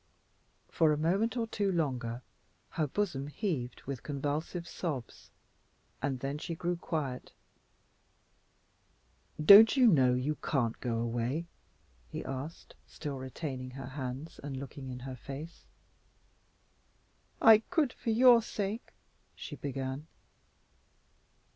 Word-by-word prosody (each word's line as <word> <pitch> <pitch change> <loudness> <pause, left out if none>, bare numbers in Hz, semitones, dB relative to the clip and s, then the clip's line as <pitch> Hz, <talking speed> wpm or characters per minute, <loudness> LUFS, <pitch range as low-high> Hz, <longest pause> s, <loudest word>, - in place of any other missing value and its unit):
For 160 -2 +4
a 150 - +1
moment 195 +10 +1
or 230 - +1
two 205 -3 -1
longer 130 -8 -2 0.5
her 155 -4 -1
bosom 145 -5 -2
heaved 145 - -3
with 135 -3 -5
convulsive 150 +4 -3
sobs, 140 - -5 0.7
and 135 -2 -2
then 140 +2 -3
she 165 - -4
grew 175 +1 -1
quiet. 150 -7 -4 2.1
"Don't 205 - +9
you 255 - +6
know 130 - +5
you 140 +4 -1
can't 120 -7 0
go 120 -2 -1
away?" 120 +7 -1 0.6
he - - -6
asked, 135 +5 -6
still 145 -4 -6
retaining 130 -1 -5
her 135 -1 -6
hands 135 +3 -6
and 140 -2 -5
looking 135 0 -7
in 125 0 -6
her 130 0 -6
face. 145 +6 -9 1.7
"I 220 -1 +8
could 320 -7 +2
for - - -5
your 240 +1 +7
sake," 210 +1 -4 0.4
she - - -7
began. 135 +1 -4
145 Hz, 115 wpm, -31 LUFS, 130-175 Hz, 2.1 s, Don't